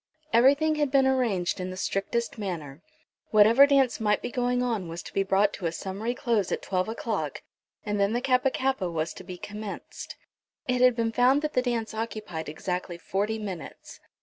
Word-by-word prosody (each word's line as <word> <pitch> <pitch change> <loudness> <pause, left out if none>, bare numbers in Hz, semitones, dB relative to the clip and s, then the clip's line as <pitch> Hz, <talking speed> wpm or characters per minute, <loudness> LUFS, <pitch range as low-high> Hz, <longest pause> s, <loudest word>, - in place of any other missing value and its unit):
Everything 280 +7 +5
had 295 -2 +1
been 270 0 +4
arranged 235 -11 +1
in 185 0 -3
the 185 - -7
strictest 220 +4 -2
manner. 165 -7 -5 0.5
Whatever 225 +6 +7
dance 270 -4 +3
might 210 -1 +2
be - - -3
going 245 0 0
on 225 -7 -1
was 165 +1 -6
to - - -10
be 195 - +2
brought 195 +1 +2
to 175 - -3
a - - -1
summary 195 +8 -4
close 230 -7 0
at - - -2
twelve 185 +2 -1
o'clock, 210 - -3 0.4
and 205 -1 -1
then 200 +1 +2
the 240 - +1
Kappa 255 +1 +2
kappa 260 -8 -1
was 165 0 -2
to - - -10
be 180 -1 -8
commenced. 210 +2 -7 0.5
It 250 0 +1
had 250 -1 +6
been 230 -1 0
found 255 +5 +3
that 305 - -2
the 250 - +3
dance 235 -3 -2
occupied 215 -8 -5
exactly 180 +2 -4
forty 205 +5 -2
minutes. 195 -6 -8
215 Hz, 190 wpm, -27 LUFS, 185-250 Hz, 0.5 s, Whatever